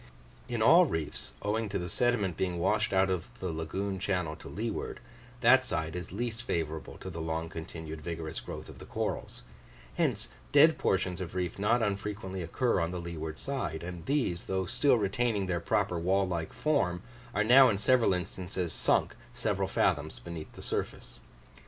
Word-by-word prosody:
In 120 -2 0
all 175 +9 +8
reefs, 80 - -4
owing 110 +1 0
to 100 - -1
the 90 -2 -3
sediment 105 -2 +1
being 90 -1 -1
washed 105 +5 +1
out 95 0 +3
of 90 -3 -2
the 90 -2 -2
lagoon 95 +5 -3
channel 90 -5 -1
to - - -10
leeward, 110 +5 -3 0.4
that 130 +2 +7
side 80 -9 -2
is 90 -2 -5
least 115 +3 -3
favourable 80 -9 -3
to 95 - -7
the 85 -1 -5
long 80 0 -2
continued 80 -1 -7
vigorous 80 -1 -4
growth - - -7
of - - -11
the - - -10
corals; - - -3 0.5
hence - - +1 0.2
dead - - +6
portions 90 0 +1
of 90 0 -6
reef 90 0 -2
not 115 +4 +3
unfrequently 100 -2 -3
occur 105 +7 +1
on 85 -1 0
the 90 0 -4
leeward 80 -2 -5
side; 130 - -3
and 90 -1 -7
these, 130 -12 0
though 95 0 -1
still 130 +7 +3
retaining 105 0 +1
their 90 -2 0
proper 85 +1 0
wall 95 +3 +2
like 85 -3 -2
form, 100 - +1 0.3
are 105 - +3
now 130 +4 +8
in 100 - +1
several 120 +3 +4
instances 90 -2 -3
sunk - - +2 0.2
several - - 0
fathoms - - +1
beneath 85 -2 -7
the - - -10
surface. - - -4
95 Hz, 175 wpm, -30 LUFS, 85-110 Hz, 0.5 s, all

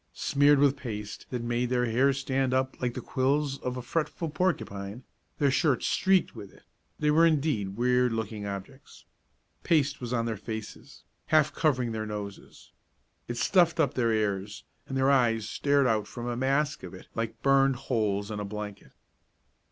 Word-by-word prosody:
Smeared 145 +1 +4
with 140 0 +3
paste 105 -6 -6
that 125 -2 -3
made 120 +1 -1
their 125 -1 +1
hair 125 +4 +3
stand 135 -1 0
up 130 0 -1
like 120 -1 -1
the - - -4
quills 140 +1 0
of 125 0 -4
a 125 - -5
fretful 165 +4 -2
porcupine, 120 - -2 0.3
their 140 -2 +2
shirts 140 -1 +2
streaked 190 -1 +2
with 100 - -9
it, - - -20 0.3
they 150 0 +2
were 160 +2 +5
indeed 140 -12 +1
weird 125 0 +2
looking 110 -2 -4
objects. 100 +8 -9 0.6
Paste 145 -4 +1
was 120 -1 -5
on 115 -2 0
their 115 -2 -2
faces, 110 +1 -8 0.2
half 155 -1 +3
covering 130 -7 +1
their 110 -1 -3
noses. 105 -2 -8 0.6
It 120 - -4
stuffed 170 +2 +3
up 145 -5 +2
their 115 -3 +1
ears 105 -2 -1 0.2
and 135 - -3
their 135 +1 +3
eyes 115 -5 +2
stared 140 +2 +2
out 110 -4 +1
from 120 -1 -7
a 120 0 -2
mask 140 +4 0
of 90 0 -9
it 95 - -12
like 115 0 -4
burned 135 -1 +4
holes 110 -6 -1
in 105 - -4
a - - -3
blanket. 105 0 -7
125 Hz, 175 wpm, -28 LUFS, 110-140 Hz, 0.6 s, were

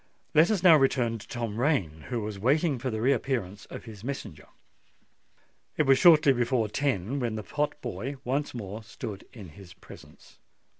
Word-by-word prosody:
Let 160 +3 +5
us 205 -5 0
now 170 -4 +8
return 125 -4 +1
to - - -13
Tom 115 -3 -4
Rain, 95 - 0
who 120 -3 -2
was 105 -2 -5
waiting 140 - +2
for 130 +2 -3
the 110 -2 -3
reappearance 120 -7 -1
of - - -9
his 110 -3 -11
messenger. 110 - -6 1.3
It 155 - +4
was 135 -2 +4
shortly 155 -5 +7
before 120 -2 0
ten 135 -1 -1
when 120 -4 -2
the 110 - -5
pot 150 +4 -2
boy 130 +3 -4
once 135 +2 -2
more 105 -1 -6
stood 105 -1 -8
in 100 -7 -11
his 90 +3 -14
presence. 95 - -16
120 Hz, 170 wpm, -27 LUFS, 105-140 Hz, 1.3 s, now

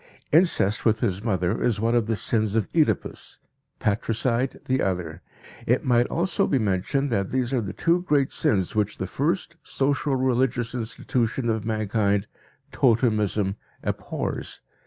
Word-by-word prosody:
Incest 155 - +3
with 110 -1 +2
his 100 -4 -1
mother 90 -6 0
is 115 -4 +1
one 115 +2 +1
of 120 -3 +2
the 115 - +1
sins 110 +1 0
of 110 -4 +1
Oedipus, 155 -3 0 0.4
patricide 115 +4 0
the 130 0 +1
other. 90 -3 -2 0.5
It 125 +6 +2
might 120 -1 +3
also 170 +1 0
be 140 - +2
mentioned 110 +6 0
that 100 -4 0
these 130 0 -1
are 125 - +2
the 100 -2 -4
two 170 +1 +1
great 145 -6 +1
sins 95 -4 +1
which 105 -1 0
the - - -3
first 165 - -2
social 140 0 0
religious 125 -2 +1
institution 120 +1 -1
of 110 -1 -2
mankind, 105 -2 0 0.5
totemism, 110 -5 +2 0.3
abhors. - - -4
115 Hz, 145 wpm, -25 LUFS, 105-130 Hz, 0.5 s, Incest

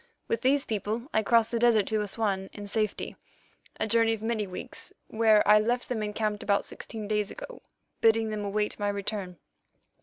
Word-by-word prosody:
With 230 - -1
these 275 +2 +3
people 220 +3 -3
I 220 - +3
crossed 230 +1 +3
the 235 - 0
desert 230 -4 +4
to 215 -1 +1
Assouan 200 -2 -2
in 205 - -7
safety, 215 0 -2 0.6
a - - +1
journey 225 0 +3
of 220 -1 -5
many 220 -2 -1
weeks, 185 - -6 0.2
where 220 -2 +4
I 210 0 +8
left 240 +3 -1
them 235 -3 -1
encamped 210 0 -2
about 200 -1 +1
sixteen 220 -2 -6
days 210 -1 0
ago, - - -9 0.4
bidding 225 -1 +3
them 210 -1 -3
await 210 +2 -1
my 205 0 0
return. 200 -2 -4
215 Hz, 180 wpm, -28 LUFS, 205-230 Hz, 0.6 s, I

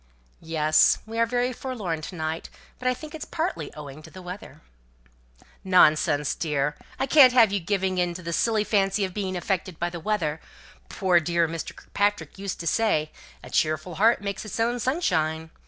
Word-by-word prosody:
"Yes! 155 -1 +3
We 225 +1 -5
are 230 - +3
very 245 +1 0
forlorn 210 -12 -4
to 180 - -7
night; 160 0 -4 0.3
but 255 - -3
I 255 - +3
think 305 +4 -10
it's 315 - -6
partly 315 - -3
owing 150 -1 -9
to - - -13
the 185 0 -11
weather!" 180 +3 -9 1.0
"Nonsense, 155 -5 +4
dear. 150 -2 -1 0.2
I - - 0
can't 270 -3 +7
have 230 -5 +6
you 200 - 0
giving 190 0 -1
in 175 -1 0
to 180 - -8
the 170 0 -4
silly 220 +3 +2
fancy 195 -1 +1
of 185 - -7
being 190 -2 -3
affected 185 -1 -2
by 175 - -1
weather. 170 -3 -2 0.5
Poor 185 -3 +3
dear 170 0 +1
Mr. 165 0 -6
Kirkpatrick 205 -1 -2
used 195 -1 -4
to - - -7
say, 160 -7 +1 0.3
'a - - -11
cheerful 155 +3 0
heart 230 +1 +5
makes 200 -1 -3
its 215 +1 -6
own 240 +2 +1
sunshine.' 160 - 0
185 Hz, 180 wpm, -25 LUFS, 160-220 Hz, 1.0 s, can't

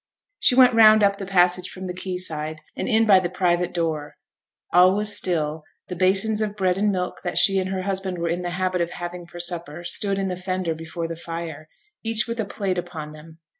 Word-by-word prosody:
She 250 - +4
went 250 -1 +6
round 215 -1 +7
up 200 0 +2
the 195 - -6
passage 180 -1 +3
from 190 0 -8
the 180 - -4
quay 180 0 -5
side, 155 -3 -3
and - - -4
in 225 -1 +3
by 200 -3 +6
the 180 -1 -3
private 180 -1 0
door. 155 -4 -3 0.6
All 180 +2 +6
was 210 0 0
still; 155 -3 -1 0.3
the 180 - -4
basins 195 +4 +3
of 210 -1 -2
bread 190 -2 0
and 210 0 +2
milk 180 -2 -3
that 180 - -3
she 195 -1 +4
and 185 0 -2
her 190 -1 -3
husband 190 -1 -3
were 170 0 -2
in 170 +2 -2
the 175 - -3
habit 185 0 -1
of 170 - -1
having 175 0 -7
for 175 - -11
supper 175 -2 0
stood 200 +2 0
in 195 -1 -1
the 180 - -3
fender 185 -2 -3
before 165 +1 -6
the 165 - -5
fire, 165 -2 -7 0.3
each 225 -1 +1
with 230 0 -5
a 220 - 0
plate 195 -2 -2
upon 160 -4 -7
them. 155 +1 -14
180 Hz, 225 wpm, -23 LUFS, 170-195 Hz, 0.6 s, round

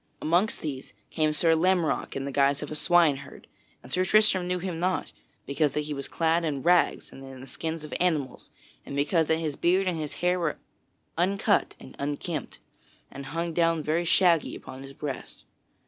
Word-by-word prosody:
Amongst 175 +7 +1
these 140 -4 -6 0.2
came 155 -1 +1
Sir 165 +2 +3
Lamorack 175 0 +1
in 135 0 -3
the 140 - -4
guise 140 +1 +2
of 150 - -7
a - - -3
swineherd, 150 -4 +2 0.4
and - - -8
Sir 185 - +2
Tristram 190 -2 +4
knew 180 0 0
him 180 -2 -4
not, 180 +1 -1 0.3
because 140 0 0
that 150 - 0
he 150 0 -4
was 140 -1 -5
clad 165 +1 +1
in 145 -4 -2
rags 175 0 +2
and 135 - -11
in 135 -1 -10
the 130 - -9
skins 160 +3 -5
of 150 - -8
animals 155 -8 -1 0.3
and 140 - -7
because 155 +3 +2
that 160 - +2
his 155 -3 -3
beard 185 +5 +2
and 175 -3 -1
his 150 -2 -4
hair 180 +1 0
were 165 -3 -1 0.6
uncut 200 +4 +1
and - - -13
unkempt, 145 +1 -4 0.5
and 140 0 -8
hung 165 +3 -3
down 165 -1 +2
very 160 +3 0
shaggy 170 -1 +3
upon 130 - -10
his 135 0 -10
breast. 140 -1 -7
160 Hz, 190 wpm, -27 LUFS, 145-175 Hz, 0.6 s, Tristram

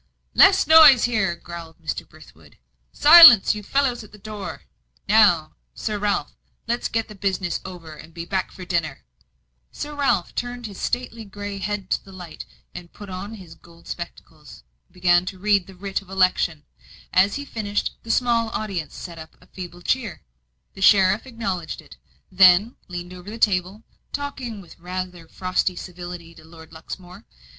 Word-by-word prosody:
"Less 385 0 +6
noise 305 -5 +8
there!" 215 -7 0
growled 170 -1 -10
Mr. 160 -2 -5
Brithwood. - - -18 0.3
"Silence, 300 - +9
you 210 - -6
fellows 250 +2 0
at 210 - -15
the 210 - -14
door! 210 -1 -8 0.4
Now, 195 -7 +4 0.2
Sir 215 -2 -3
Ralph, 205 0 -1 0.3
let's 235 +1 -1
get 225 0 -2
the 215 - -11
business 190 -2 -2
over, 175 -4 -9
and 155 +1 -13
be 170 0 -7
back 190 +1 -2
for 185 - -10
dinner." 165 - -2 0.7
Sir 295 0 -6
Ralph 275 -11 0
turned 245 0 -5
his 200 -3 -8
stately 245 -2 -3
grey 205 0 -7
head 200 -1 -4
to - - 0
the 195 - -15
light, 180 -4 -10 0.5
put 205 -2 -10
on 200 +4 -6
his 180 -6 -12
gold 170 0 -19
spectacles, 160 - -10 0.2
and - - -34
began 180 0 +3
to 190 - -6
read 200 -1 +1
the 190 - -13
writ 195 +1 -4
of 195 - -19
election. 185 -5 +1 0.5
As 195 +2 +4
he 285 - -5
finished, 210 -5 -3
the 230 - -14
small 235 -1 +1
audience 190 -9 -4
set 170 -3 -9
up 160 0 -12
a - - -21
feeble 175 -1 -10
cheer. 230 -10 -2 0.5
The 195 - -12
sheriff 195 +4 +4
acknowledged 195 -9 -4
it, - - -15 0.3
then 190 +4 +5
leaned 175 0 -7
over 180 +2 -10
the 225 - -7
table 195 0 0 0.3
talking 260 -7 -5
with 175 -2 -16
rather 180 -1 -6
frosty 185 +1 -1
civility 175 -1 -9
to 160 - -16
Lord 160 0 -15
Luxmore. 180 +3 -10
190 Hz, 165 wpm, -23 LUFS, 175-220 Hz, 0.7 s, Silence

